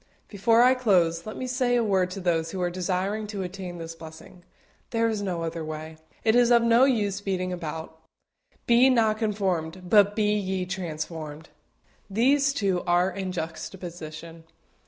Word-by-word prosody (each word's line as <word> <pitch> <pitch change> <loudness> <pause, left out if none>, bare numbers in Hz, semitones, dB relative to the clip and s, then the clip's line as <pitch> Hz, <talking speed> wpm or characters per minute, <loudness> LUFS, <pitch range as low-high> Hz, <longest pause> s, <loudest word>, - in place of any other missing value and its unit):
Before 225 +3 +3
I 255 +1 +6
close, 180 -8 +1
let 215 - -6
me 255 - -4
say 250 -1 +1
a 240 - +2
word 190 -4 +1
to 185 - -7
help 185 - -10
those 165 -2 +1
who 190 - -5
are 175 - 0
desiring 185 +4 -2
to 205 -2 -4
attain 180 -1 -7
this 165 0 -7
blessing. 160 +2 -12 0.5
There 230 0 +1
is 220 -2 -2
no 180 -4 -2
other 165 0 -4
way. 155 0 -7 0.3
It 220 0 +3
is 245 -1 +5
of 235 -1 +5
no 235 +2 +5
use 205 -7 0
beating 185 -2 -2
about. 160 -1 -6 0.7
BE 240 +2 +5
NOT 220 -4 +2
CONFORMED, 185 -5 -2
BUT 205 -1 +5
BE 210 -1 +2
YE 190 -2 -2
TRANSFORMED. 160 -4 -6 0.6
These 275 +7 +3
two 190 -6 0
are 175 +2 +3
in 190 -1 -4
juxtaposition. 165 -1 -7
190 Hz, 170 wpm, -26 LUFS, 170-220 Hz, 0.7 s, I